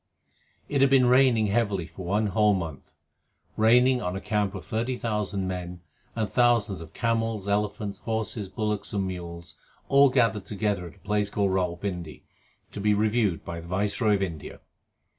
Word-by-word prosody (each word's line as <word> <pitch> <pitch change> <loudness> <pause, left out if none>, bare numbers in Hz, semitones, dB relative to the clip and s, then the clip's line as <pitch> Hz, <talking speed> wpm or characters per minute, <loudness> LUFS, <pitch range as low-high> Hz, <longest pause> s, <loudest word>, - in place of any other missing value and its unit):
It 140 -2 0
had 135 - +5
been 135 -2 +5
raining 125 -3 +4
heavily 100 -4 0
for 85 +4 -10
one 105 +5 0
whole 105 0 +4
month 80 -7 -6 0.6
raining 125 +3 +4
on 90 -2 -3
a - - -3
camp 105 -1 -1
of 95 - -7
thirty 120 +3 -2
thousand 105 -4 -2
men 90 -1 -5 0.3
and 110 -2 -1
thousands 105 -4 +2
of 80 - -12
camels, 115 -3 -1
elephants, 105 0 -1
horses, 110 -3 -3
bullocks, 105 -1 -2
and 100 -2 0
mules 85 -3 -7 0.4
all 140 0 +6
gathered 115 -6 +1
together 100 -3 -2
at 85 - -13
a 100 - -24
place 105 +2 0
called 100 -1 0
Rawal 90 -2 -1
Pindi, 90 -6 -5 0.5
to 100 - -6
be 105 0 +3
reviewed 105 -4 +1
by 85 -1 -5
the 85 - -10
Viceroy 105 +4 +1
of 100 - -1
India. 80 -6 -6
105 Hz, 170 wpm, -26 LUFS, 95-110 Hz, 0.6 s, all